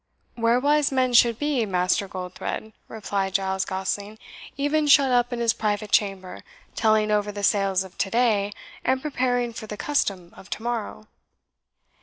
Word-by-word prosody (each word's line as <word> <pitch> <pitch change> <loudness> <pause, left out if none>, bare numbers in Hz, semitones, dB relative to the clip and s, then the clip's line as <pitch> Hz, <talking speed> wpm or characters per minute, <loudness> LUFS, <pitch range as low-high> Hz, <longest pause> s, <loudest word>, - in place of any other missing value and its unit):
"Where 230 +1 +2
wise 295 +2 +2
men 255 -2 +1
should 235 -1 +5
be, 290 -4 0
Master 185 +1 +1
Goldthred," 185 +4 -6
replied 195 -3 -3
Giles 190 -1 0
Gosling; 200 +3 -4 0.4
"even 295 +2 +1
shut 280 -2 +6
up 245 0 +2
in 240 - -3
his 235 -1 +2
private 210 -1 -2
chamber, 195 -3 0 0.3
telling 215 -1 +2
over 210 0 +1
the 205 0 -7
sales 195 -2 +2
of 190 - -13
to 195 - 0
day, 215 -3 +2 0.3
and 260 -5 +1
preparing 250 -4 -1
for 220 -1 -8
the 210 - -7
custom 195 -12 -1
of 195 - -14
to 220 - -5
morrow." 230 -2 -4
215 Hz, 160 wpm, -24 LUFS, 195-245 Hz, 0.4 s, shut